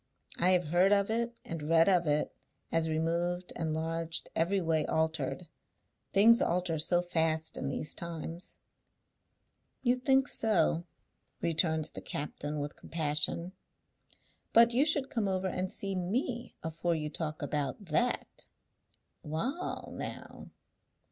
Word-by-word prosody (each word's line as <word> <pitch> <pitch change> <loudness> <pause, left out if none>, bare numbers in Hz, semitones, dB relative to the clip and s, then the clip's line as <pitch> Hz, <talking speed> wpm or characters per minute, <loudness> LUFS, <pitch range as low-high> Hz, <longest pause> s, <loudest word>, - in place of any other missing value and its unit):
I 180 - +5
have 180 -1 +5
heard 180 +4 +4
of 200 +1 +3
it, 235 +1 -1
and 165 -2 -5
read 165 0 +6
of 180 -4 +4
it, 150 0 +1 0.4
as 165 -1 +1
removed, 170 +3 -1
enlarged, 165 +1 -2
every 180 +5 +2
way 160 -3 +1
altered. 160 +1 -1 0.6
Things 230 +4 +6
alter 175 -2 +1
so 175 +3 +3
fast 160 -2 0
in 135 - 0
these 145 +2 -2
times." 170 0 -6 1.3
"You 245 0 +3
think 265 +1 +3
so," 175 - +2 0.5
returned 160 -1 0
the - - -7
captain, 145 +1 -4
with 145 0 -4
compassion; 155 +2 -2 1.0
"but 230 +1 +7
you 265 +5 +4
should 290 -3 +1
come 225 -4 0
over 190 0 0
and 185 0 -2
see 195 -1 -3
me 235 +7 -2
afore 165 +1 -1
you 150 -1 -3
talk 155 0 -4
about 145 +6 -2
that. 210 +10 -1 0.7
Wa'al, 230 - -3
now. - - -7
170 Hz, 130 wpm, -31 LUFS, 160-195 Hz, 1.3 s, but